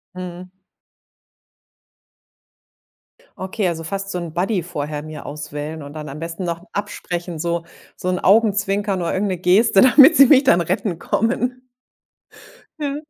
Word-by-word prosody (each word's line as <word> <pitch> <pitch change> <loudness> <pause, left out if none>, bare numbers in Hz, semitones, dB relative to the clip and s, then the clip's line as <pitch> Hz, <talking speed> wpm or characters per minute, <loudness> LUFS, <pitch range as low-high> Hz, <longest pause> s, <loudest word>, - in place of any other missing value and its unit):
Mhm. 180 0 -8 2.9
Okay, 190 +1 -2
also 165 -1 -3
fast 195 +4 -4
so 180 - -3
'n 170 -3 -6
Buddy 185 +2 -1
vorher 150 -4 -5
mir 155 0 -9
auswählen 150 +1 -6
und 145 +1 -10
dann 150 -2 -7
am 145 - -8
besten 165 +3 -6
noch 170 0 -4
absprechen, 175 -4 -5
so 170 +1 -2 0.3
so 185 - -4
'n 180 - 0
Augenzwinker 205 -1 +2
oder 175 -2 -2
irgend 195 +1 0
'ne 185 - -2
Geste, 195 +3 +4
damit 275 +4 +7
sie 275 - +9
mich 280 -1 +6
dann 175 -10 +4
retten 185 0 -2
kommen. 250 +3 -1 1.1
Ja, 285 -1 -2
180 Hz, 140 wpm, -20 LUFS, 165-205 Hz, 2.9 s, sie